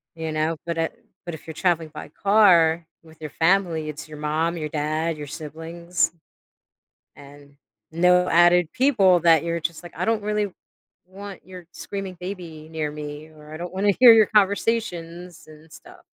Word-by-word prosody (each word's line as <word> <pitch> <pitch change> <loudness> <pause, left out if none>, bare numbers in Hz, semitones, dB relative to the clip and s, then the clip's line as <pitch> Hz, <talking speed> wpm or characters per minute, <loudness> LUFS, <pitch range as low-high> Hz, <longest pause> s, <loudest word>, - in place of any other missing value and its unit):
you 160 -1 -4
know, 155 +1 -1
but 170 -1 -3
it 165 0 -4 0.2
but 175 - -5
if 160 - -15
you're 160 - -7
traveling 165 -1 0
by 150 - -9
car 170 -4 +4 0.2
with 160 -1 -18
your 155 - -6
family, 165 -1 +1
it's 150 +1 -8
your 150 - -9
mom, 155 +3 -1
your 155 -2 -4
dad, 155 +2 -2
your 150 -1 -7
siblings, 165 +4 -3 1.0
and 145 0 -16 0.4
no 180 +2 +3
added 175 -1 +4
people 235 -9 +4
that 165 -2 +4
you're 170 0 -2
just 165 0 -4
like, 175 - -11
"I 180 - -1
don't 225 0 0
really 210 -1 -1 0.6
want 195 +1 -10
your 180 -2 -11
screaming 195 -1 -7
baby 170 -4 -8
near 155 -2 -3
me," 150 +1 -8
or, 150 -1 -16
"I - - -6
don't 175 +2 -7
wanna 200 +2 +2
hear 245 -2 +10
your 220 -2 +5
conversations 185 -5 -1
and 155 +1 -17
stuff." - - -15
170 Hz, 170 wpm, -23 LUFS, 155-185 Hz, 1.0 s, hear